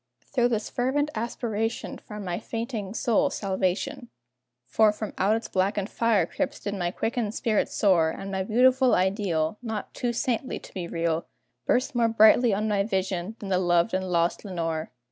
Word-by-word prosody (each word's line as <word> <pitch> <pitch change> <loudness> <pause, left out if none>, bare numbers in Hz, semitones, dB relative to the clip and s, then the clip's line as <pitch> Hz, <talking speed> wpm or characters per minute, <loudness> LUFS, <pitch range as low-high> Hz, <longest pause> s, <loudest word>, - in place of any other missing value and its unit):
Through 245 -3 +3
this 220 -3 -1
fervent 285 +4 0
aspiration 225 0 -3
Found 210 -2 -8
my 175 -1 -2
fainting 225 -3 -4
soul 230 -2 +2
salvation, 200 +7 -2 0.6
For 215 +11 +4
from 210 0 -6
out 205 +3 +3
its 225 - -3
blackened 195 +2 0
fire 225 -6 +2
crypts 285 - -3
did 200 - -4
my 180 -3 -1
quickened 225 +3 -2
spirit 215 -3 +1
soar; 175 -6 +3
And 195 +4 -6
my 190 -1 -1
beautiful 255 +5 +4
ideal 185 -2 0
Not 220 -4 -5
too 245 - -1
saintly 245 +1 -1
to - - -13
be 180 -3 -4
real 165 -1 -1 0.4
Burst 255 +3 +2
more 235 -2 +3
brightly 225 +2 +6
on 210 +2 0
my 205 -2 +2
vision 190 -1 -2
than 200 - -7
the 185 -1 +2
loved 175 +2 +2
and 185 0 -1
lost 170 -1 +1
Lenore. 165 -5 -3
210 Hz, 170 wpm, -26 LUFS, 185-230 Hz, 0.6 s, brightly